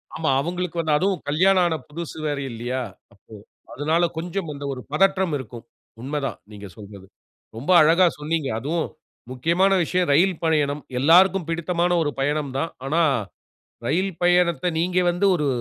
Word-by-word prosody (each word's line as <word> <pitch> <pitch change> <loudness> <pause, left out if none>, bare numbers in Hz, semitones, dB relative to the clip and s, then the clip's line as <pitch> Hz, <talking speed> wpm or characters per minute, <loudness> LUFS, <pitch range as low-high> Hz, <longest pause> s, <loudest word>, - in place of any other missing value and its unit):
ஆமா 160 -2 -1
அவுங்களுக்கு 175 +1 -3
வந்து, 155 -2 0
அதுவும் 190 -1 0
கல்யாணம் 185 +4 +3
ஆன 160 - -1
புதுசு 165 +1 -7
வேற, 145 -1 -2
இல்லையா? 120 +3 -4 0.3
அப்போ 105 +2 -20 0.4
அதுனால 160 +4 0
கொஞ்சம் 170 0 -4
அந்த 140 0 -7
ஒரு 125 - -8
பதற்றம் 190 0 +2
இருக்கும். 120 -2 -10 0.4
உண்மை 145 +3 -3
தான் - - -4
நீங்க 100 -1 -9
சொல்வது. 100 -2 -12 0.5
ரொம்ப 145 +10 -2
அழகா 165 +4 +5
சொன்னீங்க. 155 -1 -2
அதுவும் 160 +6 -2 0.4
முக்கியமான 170 +9 +1
விஷயம் 180 0 0
ரயில் 175 +2 +2
பயணம். 150 -2 +1 0.2
எல்லாருக்கும் 175 +4 +4
பிடித்தமான 170 +1 -1
ஒரு 145 - 0
பயணம் 145 0 -1
தான். 165 - -2
ஆனா 160 +5 +1 0.9
ரயில் 185 +8 0
பயணத்த, 175 0 +2
நீங்க 180 +2 0
வந்து 180 +3 0
ஒரு 150 -4 -1
160 Hz, 150 wpm, -23 LUFS, 145-180 Hz, 0.9 s, அழகா